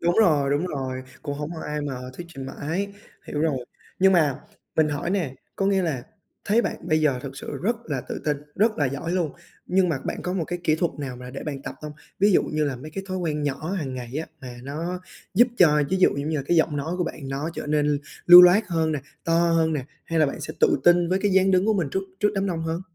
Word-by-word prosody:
Đúng 175 +1 +1
rồi, 150 -9 +3
đúng 145 +6 +1
rồi, 130 -4 -4 0.2
cũng 145 -2 -3
hổng 150 +2 -5
có 160 - -6
ai 150 0 -2
mà 145 -2 -3 0.2
thuyết 170 +6 -8
trình 135 -1 -6
mãi, 180 +9 -3 0.3
hiểu 150 - -3
rồi. 145 -6 0 0.3
Nhưng 190 +1 +5
mà 155 -6 +3 0.4
mình 155 -1 +4
hỏi 160 +4 -2
nè, 170 -10 -1 0.2
có 195 - +1
nghĩa 195 -1 +2
là 150 -8 -2 0.4
thấy 225 +3 +3
bạn - - -2
bây 155 -1 +3
giờ 140 -5 +2
thực 135 -1 -7
sự - - -6
rất 235 +4 +1
là 140 -4 -2
tự - - -4
tin, 150 -1 +1 0.2
rất 215 -1 +2
là 145 - +3
giỏi 145 +6 -3
luôn, 175 -5 0 0.3
nhưng 185 0 +3
mà 160 - 0
bạn - - -3
có 180 - -2
một 180 -3 -1
cái 175 +2 -4
kỹ 155 - +4
thuật 170 +1 0
nào 130 -4 -5
mà 125 0 -9
để 135 - -7
bạn 140 -3 -5
tập - - -6
hông? 150 -1 -6 0.3
Ví 205 +1 +4
dụ - - +5
như 155 0 -1
là 140 -3 -2
mấy 150 +5 -9
cái 195 +4 -6
thói 185 - -2
quen 155 -4 -2
nhỏ 145 +3 -2
hàng 145 -9 -3
ngày 125 +1 -6
á 160 - -3
mà 125 -2 -8
nó 165 +6 -4 0.3
giúp 240 +5 +6
cho, 150 -4 +6
ví 190 - +2
dụ 185 - +5
giống 140 +2 -2
như 160 - 0
là, 140 - -2
cái 175 - +2
giọng 160 -2 +2
nói 150 +4 -3
của 175 - +1
bạn 140 -5 -6
nó 140 +4 -3
trở - - -5
nên 150 -1 +2 0.3
lưu 175 +1 +12
loát 185 +5 +6
hơn 160 -2 +1
nè, 150 - -1 0.3
to 165 - 0 0.2
hơn 160 -1 +2
nè, 140 -4 -2 0.2
hay 165 -1 -1
là 155 - +5
bạn 140 - -4
sẽ - - -5
tự - - +4
tin 175 0 +5
với 185 +2 +2
cái 205 - +2
dáng 190 0 +4
đứng 185 +2 +3
của 220 - +3
mình 175 -7 0
trước 190 - -1 0.2
trước 210 - +4
đám 195 0 0
đông 170 -3 -2
hơn? 165 +2 -2
160 Hz, 270 wpm, -24 LUFS, 145-180 Hz, 0.4 s, lưu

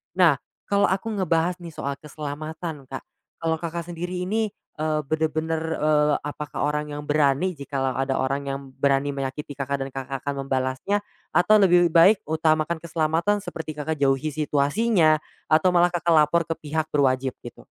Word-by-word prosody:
nah 170 -7 +5 0.2
kalau 200 0 +2
aku 195 +5 -1
ngebahas 180 -3 0
nih 170 -3 -10
soal 140 0 -4
keselamatan 150 0 -6
Kak, 135 0 -7 0.4
kalau 160 -1 0
Kakak, 170 0 -4
sendiri 180 +2 -4
ini, 215 +3 0 0.3
eee, 155 0 +1
bener-bener, 160 +1 -1 0.2
eee, 150 -1 +3
apakah 150 -1 -4
orang 150 0 -2
yang 145 - -5
berani 145 +4 +2
jikalau 135 -3 -2
ada 135 +1 -1
orang 135 +2 0
yang 135 0 -2
berani 140 +1 +1
menyakiti 140 +2 -4
Kakak, 140 0 -2
dan 135 - -6
Kakak, 135 0 -4
akan 140 -1 -2
membalasnya? 130 +9 0 0.3
Atau 210 +4 +5
lebih 175 -2 +5
baik 190 +5 +7
utamakan 155 +1 +1
keselamatan 165 +4 +1
seperti 160 -6 -7
Kakak, 155 +2 -2
jauhi 140 +2 +1
situasinya, 155 +3 +2 0.3
atau 160 +4 +4
malah 175 0 +3
Kakak, 170 0 0
lapor 155 +3 +4
ke 165 - -2
pihak 155 +1 -3
berwajib 130 -2 +1
gitu? 120 - -11
155 Hz, 160 wpm, -24 LUFS, 140-170 Hz, 0.4 s, baik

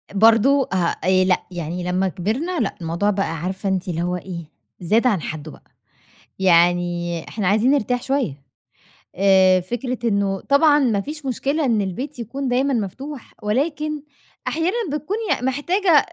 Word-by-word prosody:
برضه 230 +6 +5
ها 185 -2 +1 0.2
آآ 185 +1 +4
لأ 185 -1 +2
يعني 175 0 -4
لمّا 180 +2 0
كبرنا، 235 - -2
لأ، 220 - -1
الموضوع 170 +5 0
بقى 195 -5 -1
عارفة 190 +2 -2
أنتِ 190 0 -1
اللي 170 -1 -2
هو 180 +1 -1
إيه 175 -2 -7 0.3
زاد 215 +8 +2
عن 200 -9 +1
حدّه 155 0 -6
بقى - - -18 0.7
يعني 175 -2 +2
إحنا 205 -4 -2
عايزين 215 +6 +3
نرتاح 250 -3 +1
شوية 250 - -2 0.7
آآ 190 -1 +5
فكرة 240 +6 -4
إنه 200 -2 0
طبعًا 290 +1 +4
ما 230 -8 +2
فيش 300 +6 -7
مشكلة 280 +4 -1
إن 225 -5 +2
البيت 250 +9 -5
يكون 265 +4 -4
دايمًا 260 +2 +1
مفتوح، 260 +6 -5
ولكن 295 +7 -1 0.5
أحيانًا 330 +7 0 0.2
بتكوني 305 +9 -3 0.2
محتاجة 290 +10 0
أ 300 - +8
210 Hz, 155 wpm, -21 LUFS, 180-275 Hz, 0.7 s, أ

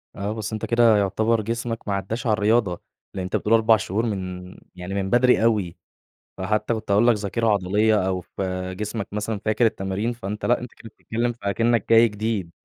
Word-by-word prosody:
آه 100 +2 -3
بس 110 0 -5
أنت 110 - -3
كده 115 -2 +4
يعتبر 110 +3 +1
جسمك 115 +1 -4
ما 100 - 0
عداش 110 +6 -3
على 110 - +3
الرياضة؛ 105 -4 +1 0.4
لأن 95 - -4
أنت 90 - -3
بتقول 110 - +1
4 110 -1 +5
شهور 105 +4 -2
من 90 -3 -5 0.2
يعني 90 +2 -7
من 95 -1 -2
بدري 125 -1 +4
أوي، 105 -7 +1 0.6
فحتى 105 +4 -1
كنت 110 -2 -4
هاقول 105 +4 +4
لك 120 - +5
ذاكرة 105 +3 -2
عضلية 105 0 +2
أو 95 -1 -1
ف 90 - -9 0.3
جسمك 105 +2 -4
مثلًا 105 0 -3
فاكر 110 +2 +2
التمارين، 105 +2 -1
فأنت 105 -2 -6
لأ، 120 - +2
أنت 125 -1 -9
كده 115 - -13
بتتكلم 120 +3 -3
في 120 - -27
أكنك 115 +1 +1
جاي 115 +1 +7
جديد. 105 -4 -3
105 Hz, 195 wpm, -23 LUFS, 100-115 Hz, 0.6 s, جاي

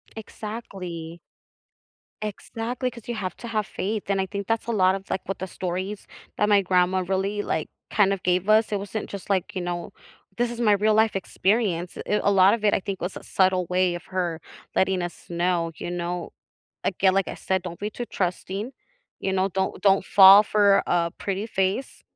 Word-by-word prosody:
Exactly. 190 -7 -7 1.0
Exactly, 235 +4 -4
'cause 235 -3 -13
you 240 - -3
have 190 -4 -4
to 235 - -8
have 215 -2 -1
faith, 210 +2 -3
and 195 -1 +2
I 190 - -2
think 200 +1 -5
that's 225 +2 -1
a - - 0
lot 190 -4 +4
of, 195 0 -6
like, 190 - -1
what 195 - -4
the 190 - -4
stories 185 +3 -4 0.3
that 210 - +2
my 205 -1 +5
grandma 185 0 +2
really, 195 +2 0
like, 160 -6 -2 0.2
kind 195 -2 +3
of 195 - -4
gave 180 +2 +1
us, 220 +1 +4
it 205 - +1
wasn't 205 +2 -5
just, 200 -1 -8
like, 190 -2 0
you 185 - -2
know 175 -1 -4 0.5
this 240 0 +1
is 240 0 -5
my 215 - +4
real 210 +2 +3
life 220 0 +3
experience, 190 -2 0
it 210 - +1
a 200 - +3
lot 195 0 +6
of 230 -2 -2
it, 210 - +4
I - - +3
think, 195 0 -5
was 180 +2 -3
a - - -10
subtle 185 -1 +2
way 180 0 +1
of 175 - -8
her 175 -3 -2 0.4
letting 190 -1 +2
us 175 0 -7
know, 170 -1 0
you - - -6
know 175 0 -3 0.5
again, 190 0 +2
like 195 -3 +1
I - - -5
said, 190 -1 -1
don't 175 -2 -7
be 210 +1 -3
too 240 +3 -6
trusting, 195 +6 -3 0.5
you 190 - -1
know, 190 +1 +1
don't 190 +1 -2
don't 195 -1 +4
fall 195 +1 +9
for 205 -2 +4
a 170 -1 +1
pretty 200 +2 -3
face. 195 +4 -2
195 Hz, 205 wpm, -25 LUFS, 180-210 Hz, 1.0 s, fall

